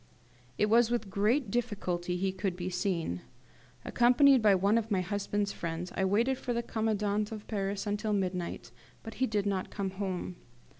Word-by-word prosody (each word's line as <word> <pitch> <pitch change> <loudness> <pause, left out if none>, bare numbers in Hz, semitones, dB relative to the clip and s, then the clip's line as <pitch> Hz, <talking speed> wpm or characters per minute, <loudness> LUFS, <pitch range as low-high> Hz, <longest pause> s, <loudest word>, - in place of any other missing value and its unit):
It - - +3
was 230 +2 +4
with 235 -5 -2
great 215 +4 +1
difficulty 185 -7 -2
he 190 +1 0
could 190 -1 -2
be 180 +1 -4
seen. 175 - -1 0.6
Accompanied 255 +2 +5
by 210 -2 +5
one 200 +5 +3
of 225 -1 -6
my 195 -4 +1
husband's 205 +1 -1
friends, 170 +1 -4
I 190 - +1
waited 230 +7 +2
for 245 - -2
the 235 0 -1
commandant 210 -2 -1
of 215 -1 -7
Paris 200 -1 -2
until 210 +1 -1
midnight, 180 - -2 0.3
but 225 - -7
he 260 - +4
did 210 -3 0
not 195 -2 -1
come 195 -2 -3
home. 185 -2 -4
205 Hz, 170 wpm, -30 LUFS, 185-220 Hz, 0.6 s, Accompanied